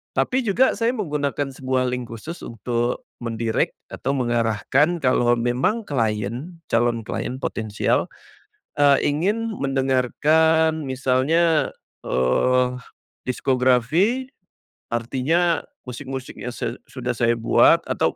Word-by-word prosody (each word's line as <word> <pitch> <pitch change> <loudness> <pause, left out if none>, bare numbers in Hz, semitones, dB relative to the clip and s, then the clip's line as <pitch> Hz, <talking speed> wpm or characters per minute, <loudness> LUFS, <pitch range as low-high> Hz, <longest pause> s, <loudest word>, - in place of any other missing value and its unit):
Tapi 260 +1 +1
juga 235 +6 +3
saya 230 +1 +2
menggunakan 145 - -2
sebuah 130 -1 -1
link 125 -1 -3
khusus, 155 +10 -7
untuk 120 +2 -2 0.2
men-direct, 115 -1 -1 0.2
atau 135 - -2
mengarahkan 120 +6 +1
kalau 120 -2 +3
memang 130 - 0
klien 115 - -2 0.2
calon 115 0 +2
klien 125 - -3
potensial, 110 -5 -1 0.7
eee, 140 -1 +5
ingin 205 +10 0
mendengarkan 150 +4 +2
misalnya, 135 +5 +2 0.3
eee, 125 - +2 0.5
diskografi, 130 - +1 0.6
artinya 145 +8 +1 0.2
musik-musik 130 +1 -6
yang 125 - -4
say 120 0 -4
sudah 125 -2 -3
saya 120 0 +2
buat, 115 0 +4
atau - - 0
130 Hz, 100 wpm, -22 LUFS, 120-160 Hz, 0.7 s, eee